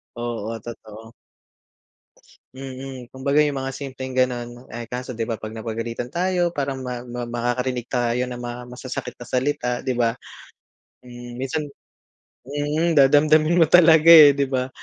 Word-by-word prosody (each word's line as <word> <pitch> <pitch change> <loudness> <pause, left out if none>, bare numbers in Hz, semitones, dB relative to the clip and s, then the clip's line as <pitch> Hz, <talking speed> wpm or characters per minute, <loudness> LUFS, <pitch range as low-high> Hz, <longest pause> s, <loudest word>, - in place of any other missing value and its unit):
Oo, 115 -1 -4
totoo. 110 -1 -11 1.4
Mm. 130 -2 -8
Kumbaga 140 +3 +2
yung 145 -2 -1
mga 135 0 -4
simpleng 130 -2 -7
gano'n, 120 -1 -2
eh, 120 -1 -7
kaso 125 +2 -5
'di 115 -2 -4
ba 115 - -2
'pag 110 0 -8
napagalitan 115 +2 -5
tayo 175 +4 0
parang 140 -1 -2
ma 125 -1 -5
ma 120 0 -6
makakarinig 120 +1 -2
tayo 120 -1 0
ng 125 -1 -6
mga 120 0 -6
masasakit 125 +1 -6
na 120 - -9
salita, 130 0 -1
'di 130 - -1
ba? 115 0 +2 0.9
Hmm, 120 -1 -10
minsan 140 +4 -3 0.8
mm, 145 +4 -1
dadamdamin 155 +3 +4
mo 165 - +6
talaga, 160 -1 +6
eh, 145 -3 +9
'di 140 - +2
ba? 130 -1 -2
125 Hz, 145 wpm, -22 LUFS, 120-140 Hz, 1.4 s, eh